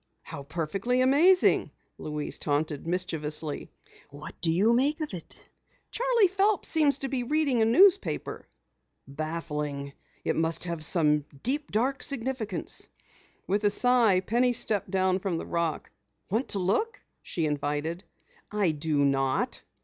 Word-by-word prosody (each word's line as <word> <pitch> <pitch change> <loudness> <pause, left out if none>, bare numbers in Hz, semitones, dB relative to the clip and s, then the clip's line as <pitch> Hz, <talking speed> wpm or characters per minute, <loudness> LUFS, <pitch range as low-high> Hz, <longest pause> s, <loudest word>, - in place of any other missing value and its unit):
"How 140 - -8
perfectly 175 - -1
amazing!" 315 +9 +4 0.3
Louise 150 -1 -4
taunted 150 +1 -2
mischievously. 155 -4 -1 0.4
"What 145 +2 -10
do 165 - +1
you 205 +8 +3
make 285 +6 +1
of 310 -7 -4
it?" 170 -3 -9 0.5
"Charley 480 -4 +3
Phelps 395 +2 +1
seems 300 -4 +3
to 275 - -3
be 265 -2 -2
reading 280 -2 +1
a - - +4
newspaper." 380 - +3 0.6
"Baffling! 150 -1 -4 0.3
It - - 0
must 160 0 0
have 170 -3 -4
some 150 -3 +2 0.2
deep, 290 +4 -2
dark 260 +6 0
significance." 245 - -3 0.6
With 200 +3 0
a 205 - +4
sigh, 230 -3 +3
Penny 245 +6 +1
stepped 210 -4 0
down 185 0 +1
from 185 -3 -2
the - - -5
rock. 170 -2 -2 0.4
"Want 230 +6 0
to - - -1
look?" 205 - 0 0.2
she 165 - -3
invited. 150 +4 -2 0.5
"I 205 -5 +1
do 150 -1 0
not!" 135 -1 0
190 Hz, 135 wpm, -27 LUFS, 155-255 Hz, 0.6 s, amazing